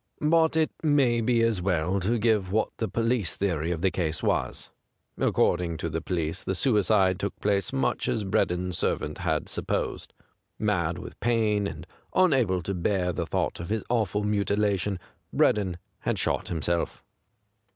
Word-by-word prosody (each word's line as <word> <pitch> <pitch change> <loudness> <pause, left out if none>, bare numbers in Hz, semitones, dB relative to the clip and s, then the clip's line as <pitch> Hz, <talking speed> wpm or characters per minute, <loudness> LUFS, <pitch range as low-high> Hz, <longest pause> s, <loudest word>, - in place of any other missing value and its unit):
But 160 +1 +3
it 160 -1 +2
may 135 -6 +3
be 115 0 +2
as 115 -5 +1
well 90 +1 +1
to 110 +6 +1
give 105 -4 +1
what 110 +2 +1
the 110 - -1
police 115 -1 0
theory 85 -5 -1
of 85 -1 -2
the 95 - +3
case 80 -3 -2
was. - - -1 0.5
According 85 -2 +1
to 85 - -3
the 80 +1 -3
police 80 -3 -2
the 95 - -2
suicide 100 -6 +3
took 100 - -3
place 100 -3 0
much 65 - 0
as 110 - 0
Breddon's 90 -2 0
servant - - -1
had - - -1
supposed. - - -2 0.5
Mad - - 0
with - - -9
pain 110 -3 +1
and - - -7 0.3
unable 125 - +3
to 100 - -2
bear 90 0 0
the - - -3
thought - - -1
of 85 - -6
his 110 -1 -1
awful 105 -3 +1
mutilation, 100 -1 +1 0.3
Breddon 95 -4 +2 0.2
had - - -1
shot - - -1
himself. 85 +1 -2
100 Hz, 160 wpm, -27 LUFS, 90-115 Hz, 0.5 s, But